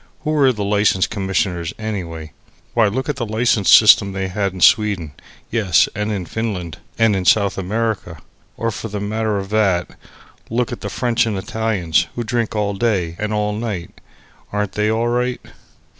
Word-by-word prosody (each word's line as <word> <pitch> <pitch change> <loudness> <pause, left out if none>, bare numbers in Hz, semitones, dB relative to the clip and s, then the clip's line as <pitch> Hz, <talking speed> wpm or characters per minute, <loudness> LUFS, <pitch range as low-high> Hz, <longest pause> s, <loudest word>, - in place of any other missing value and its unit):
Who 155 - -2
were 140 -4 +4
the 105 -4 -4
license 100 -2 +2
commissioners, 95 -4 -2
anyway? 85 -8 -5 0.4
Why, 115 -3 +4
look 130 +6 -2
at 150 - -2
the - - -2
license 110 -2 +1
system 105 -2 +7
they 95 -1 -3
had 100 +1 -1
in 95 - -9
Sweden; 95 -4 +3 0.4
yes, 105 -7 +3
and 105 +1 -2
in 95 -4 -3
Finland 95 -6 -4 0.2
and 115 -3 +3
in 95 - -1
South 100 +1 +3
America. 100 -3 -2 0.4
Or, 115 0 -1
for 110 - -6
the 105 -1 -5
matter 110 +1 -1
of 95 -1 -5
that, 100 -5 +1 0.6
look 120 +1 -1
at 120 - -6
the - - -4
French 120 -1 0
and 105 -3 -2
Italians, 95 -5 0
who 120 - -2
drink 115 -1 -2
all 105 -1 0
day 95 -6 0
and 105 0 -2
all 105 -1 0
night. 105 -5 -5 0.5
Aren't 105 -1 -1
they 105 0 0
all 115 +2 +1
right? 125 +1 0
105 Hz, 175 wpm, -19 LUFS, 95-115 Hz, 0.6 s, system